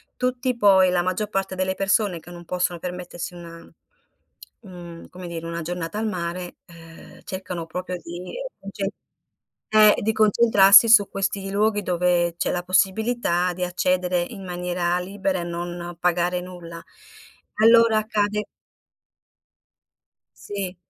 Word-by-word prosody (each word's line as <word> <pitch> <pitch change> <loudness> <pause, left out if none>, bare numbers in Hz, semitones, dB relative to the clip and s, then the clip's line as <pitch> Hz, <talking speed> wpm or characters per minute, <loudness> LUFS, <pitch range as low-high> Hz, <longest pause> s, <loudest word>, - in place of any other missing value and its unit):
tutti, 250 0 -1
poi, 190 -4 +5
la 180 -1 +2
maggior 185 +4 -2
parte 195 -2 -2
delle 185 0 -1
persone 195 -1 0
che 165 - -15
non 175 0 -11
possono 180 0 -1
permettersi 180 0 -6
una, 170 -1 -10 1.0
mhmm 175 -5 -11
un, - - -13
come 180 0 -9
dire, 165 -1 -6
una 170 0 -4
giornata 175 +2 -5
al 220 +1 -1
mare, 180 -2 -5
ehm, 165 -1 -15
cercano 185 -3 -6
proprio 180 +2 -5
di 175 +1 -9 0.3
concen 195 0 -4 0.9
eh, 215 -1 +7
di 220 +2 0
concentrarsi 215 -1 +6
su 215 -3 +6
questi 195 0 -3
luoghi 205 +1 +1
dove 175 -2 +1
c'è - - -1
la 180 - -1
possibilità 185 -1 +1
di 180 +1 -4
accedere 180 0 0
in 195 +3 -7
maniera 180 0 -1
libera 190 0 -2
e - - -3
non 175 0 -6
pagare 180 0 +1
nulla. 175 -2 -9 0.8
Allora, 230 0 +5
accade 210 -1 -1 1.9
Sì. 195 -3 -6
180 Hz, 135 wpm, -23 LUFS, 175-205 Hz, 1.9 s, eh